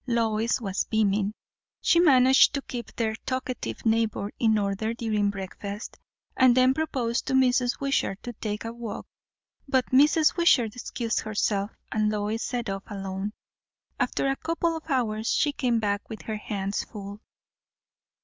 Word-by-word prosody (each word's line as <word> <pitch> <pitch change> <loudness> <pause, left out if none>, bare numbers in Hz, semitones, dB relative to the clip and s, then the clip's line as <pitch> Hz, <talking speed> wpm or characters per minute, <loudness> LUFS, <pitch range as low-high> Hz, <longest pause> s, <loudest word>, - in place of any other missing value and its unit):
Lois 230 -1 +1
was 195 -4 -2
beaming. 210 -2 +1 0.5
She 340 - +3
managed 265 -4 +6
to 280 - -2
keep 240 -2 -6
their 220 -2 0
talkative 255 -2 -4
neighbour 220 -2 +1
in 220 -2 +3
order 205 +3 -1
during 215 -3 0
breakfast; 200 +2 -6 0.4
and 255 -1 +5
then 255 +1 +5
proposed 255 -6 -1
to - - -1
Mrs. 250 -1 +3
Wishart 275 -8 0
to 240 - -5
take 210 -1 -4
a 230 - -4
walk. 235 -2 -6 0.6
But 260 -2 +1
Mrs. 300 +4 +5
Wishart 250 - +3
excused 235 -1 -2
herself, 205 -1 -1 0.2
and 215 -1 +1
Lois 210 +2 -2
set 245 -2 -3
off 195 0 -4
alone. 195 0 -4 0.7
After - - 0
a 270 - +1
couple 330 0 -1
of 320 0 -8
hours 225 -5 0
she 295 - +2
came 245 -5 0
back 205 -1 -2
with 220 - -8
her 220 -1 -4
hands 200 -1 -3
full. 205 -1 -9
225 Hz, 150 wpm, -26 LUFS, 210-255 Hz, 0.7 s, managed